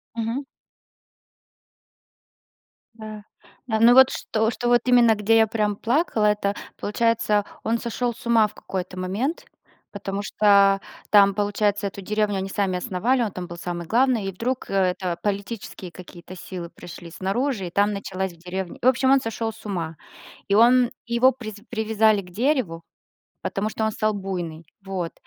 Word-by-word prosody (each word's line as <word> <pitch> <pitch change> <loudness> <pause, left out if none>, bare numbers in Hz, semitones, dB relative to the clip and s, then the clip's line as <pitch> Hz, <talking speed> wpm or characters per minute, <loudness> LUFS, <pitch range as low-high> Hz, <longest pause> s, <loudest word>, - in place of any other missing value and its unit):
Мгм. 230 +5 -2 2.5
Да. 215 -2 -9 0.4
Но 230 +2 +5
вот 265 0 +8
что, 220 0 -1
что 240 +1 +2
именно, 240 -3 +5
где 215 +2 +3
я 220 - +5
прям 210 -1 0
плакала, 235 - +1
это 205 -1 +1 0.2
получается 220 -1 +1 0.2
он 230 +1 0
сошел 240 0 -2
с - - -15
ума 230 -2 +4
в 210 - -16
какой-то 185 -1 -6
момент, 215 - -2 0.5
потому 200 0 -4
что 200 -1 +4 0.3
там, 200 -1 +6
получается, 205 0 0
эту 195 0 -8
деревню 210 0 0
они 190 0 -3
сами 190 -2 0
основали, 235 +6 0
он 215 -4 -1
там 180 -1 -6
был 170 0 -8
самый 170 0 -5
главный, 240 -1 +2
и 195 - -2
вдруг 245 +7 -3
это 185 -2 0
политические 200 -3 -4
какие-то 180 +1 -11
силы 175 -1 -7
пришли 170 -1 -11
снаружи, 195 - -2
и - - -8
там 205 +2 +2
началась 190 -2 -4
в - - -19
деревне. 180 +1 -6
В 250 - +2
общем, 260 +1 +4
он 275 -1 +5
сошел 225 0 -3
с 215 - -17
ума 165 -5 -3 0.5
и 200 - +2
он, 245 +2 +5
его 235 +2 +4
привяз 215 -4 -8
привязали 220 -2 +2
к 180 - -14
дереву, 215 - 0 0.6
потому 210 +2 -2
что 220 - -2
он 220 - +1
стал 215 +1 0
буйный, 175 -5 -5 0.2
вот, 185 -3 -4
210 Hz, 155 wpm, -24 LUFS, 190-230 Hz, 2.5 s, вот